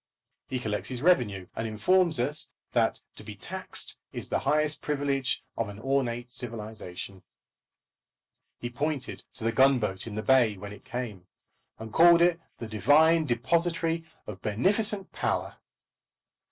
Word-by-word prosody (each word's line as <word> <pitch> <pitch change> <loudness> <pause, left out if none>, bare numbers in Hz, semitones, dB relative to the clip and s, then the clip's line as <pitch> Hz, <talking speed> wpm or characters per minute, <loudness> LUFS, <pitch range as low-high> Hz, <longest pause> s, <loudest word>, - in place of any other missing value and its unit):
He 130 - -2
collects 105 -4 -3
his 125 0 -5
revenue, 110 - +2
and 115 - -2
informs 160 - +2
us 145 +5 -1 0.2
that - - +1
to - - -11
be - - -8
taxed - - -3
is - - -6
the - - +1
highest 150 0 +1
privilege 140 -3 -1
of 115 -3 -2
an 100 - -9
ornate 120 -1 -1
civilisation. 105 -6 -7 1.4
He 120 - -5
pointed 145 +1 -3
to 115 - -6
the 115 - +2
gunboat 115 -6 +2
in 105 - -6
the 110 - -3
bay 120 -6 +4
when 100 +2 -8
it 105 - -13
came, 110 -7 -5 0.5
and 110 -1 -9
called 170 +2 +7
it 175 -1 +3 0.2
the 115 - -6
divine 150 - +4
depository 165 +6 +1 0.2
of 105 -2 -8
beneficent 195 - +1
power. - - -2
125 Hz, 140 wpm, -28 LUFS, 110-155 Hz, 1.4 s, called